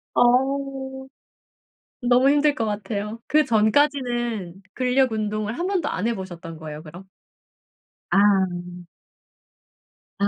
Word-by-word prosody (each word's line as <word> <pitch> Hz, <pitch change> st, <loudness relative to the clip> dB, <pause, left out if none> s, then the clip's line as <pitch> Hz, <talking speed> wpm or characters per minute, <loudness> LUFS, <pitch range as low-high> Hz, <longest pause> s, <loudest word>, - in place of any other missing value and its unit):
아우. 265 Hz, +1 st, +1 dB, 0.9 s
너무 250 Hz, +2 st, +4 dB
힘들 290 Hz, 0 st, +3 dB
것 225 Hz, -, -2 dB
같아요. 210 Hz, +1 st, -4 dB
그전까지는 240 Hz, -, +1 dB
근력 255 Hz, -1 st, +2 dB
운동을 215 Hz, +1 st, -2 dB
1 350 Hz, -, -1 dB
번도 370 Hz, -6 st, 0 dB
안 205 Hz, -, -2 dB
해 235 Hz, -, +1 dB
보셨던 175 Hz, -4 st, -8 dB
거예요 155 Hz, -1 st, -8 dB
그럼? 175 Hz, +4 st, -12 dB, 1.0 s
아. -, -, +3 dB, 2.0 s
아. 200 Hz, -, +2 dB
240 Hz, 200 characters per minute, -23 LUFS, 205-270 Hz, 2.0 s, 너무